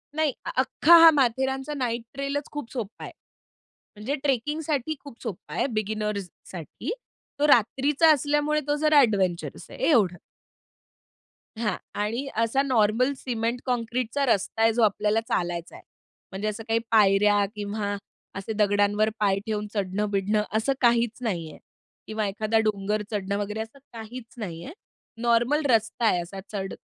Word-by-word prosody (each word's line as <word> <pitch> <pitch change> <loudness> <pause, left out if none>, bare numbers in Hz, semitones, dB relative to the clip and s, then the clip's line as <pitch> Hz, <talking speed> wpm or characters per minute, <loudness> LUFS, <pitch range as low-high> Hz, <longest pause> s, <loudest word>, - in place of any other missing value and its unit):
नाही. 310 -3 +1 0.2
अख्खा 295 +5 +5
हा 330 - +11
माथेरानचा 265 +1 0
नाईट 240 -4 -2
ट्रेलच 275 +1 -3
खूप 295 -5 -6
सोप्पा 230 -5 -6
आहे. - - -8 0.8
म्हणजे 215 +7 -3
ट्रेकिंगसाठी 295 +2 -1
खूप 280 -5 -13
सोप्पं 220 -7 -7
आहे - - +1
बिगिनर्ससाठी. 210 - -4 0.5
तो 295 - +3
रात्रीचा 280 +5 +4
असल्यामुळे 295 +1 +1
तो 290 - +2
जरा 305 0 +5
अडवेंचरस 195 -9 0
आहे - - -1
एवढं. 205 - +4 1.4
हां. 220 -2 -1 0.2
आणि 230 +6 -2 0.2
असा 230 +4 +1
नॉर्मल 250 0 +2
सिमेंट 235 -1 -2
काँक्रीटचा 250 +2 -1
रस्ता 225 -2 0
आहे 225 0 +4
जो 235 - 0
आपल्याला 210 +1 +2
चालायचा 175 -1 -2
आहे. - - -13 0.5
म्हणजे 195 +2 -3
असं 215 +1 -4
काही 225 0 +2
पायऱ्या 205 -1 +4
किंवा 205 0 -3 0.4
असे 195 +3 -4
दगडांवर 205 0 +2
पाय 200 -2 +2
ठेवून 210 -2 -2
चढण-बिडणं 205 +1 0
असं 245 +5 +1
काहीच 235 -2 +3
नाही 175 -9 -2
आहे - - -14 0.5
किंवा 215 0 -2
एखादा 215 +3 0
डोंगर 210 0 0
चढणं 200 -1 -2
वगैरे 205 +1 -3
असं 225 +5 -9
काहीच 230 +1 -9
नाही 175 -7 -6
आहे. 295 - -8 0.5
नॉर्मल 240 +6 +2
रस्ता 230 0 +2
आहे 180 -5 +3
असा 190 +3 -8
चढ 195 -2 -4
225 Hz, 140 wpm, -26 LUFS, 205-265 Hz, 1.4 s, हा